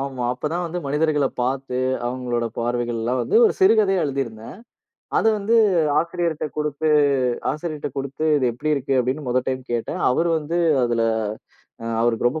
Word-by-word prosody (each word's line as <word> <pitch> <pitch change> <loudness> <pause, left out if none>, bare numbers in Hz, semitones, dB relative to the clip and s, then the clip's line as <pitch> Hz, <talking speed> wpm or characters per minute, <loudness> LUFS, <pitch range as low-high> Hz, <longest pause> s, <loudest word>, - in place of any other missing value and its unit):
ஆமா. 135 -3 -4
அப்போதான் 165 +7 -3
வந்து 175 +2 -4
மனிதர்களப் 150 -1 0
பார்த்து, 130 0 -2 0.3
அவங்களுடைய 120 -2 -2
பார்வைகள்லாம் 120 +1 -1
வந்து 430 - +1
ஒரு 435 - +4
சிறுகதையா 210 - +4
எழுதியிருந்தேன். 130 -3 -4 0.6
அதை 225 - +3
வந்து 220 +3 +1 0.4
ஆசிரியர்ட்ட 170 -2 -1
குடுத்து 150 +1 -1 0.6
ஆசிரியர்கிட்ட 155 -2 -4
குடுத்து, 140 +3 -4
"இது 130 -3 +1
எப்படி 155 +6 -2
இருக்கு?" 135 0 -1
அப்படினு 130 +4 -2
முதல் 125 +1 0
டைம் 130 0 -2
கேட்டேன். 115 -1 -3
அவரு 165 +6 +1
வந்து 160 +3 -3 0.3
அதில 120 -1 +1 1.0
அவருக்கு 120 0 +1
ரொம்ப 155 +6 -4
140 Hz, 140 wpm, -22 LUFS, 125-160 Hz, 1.0 s, ஒரு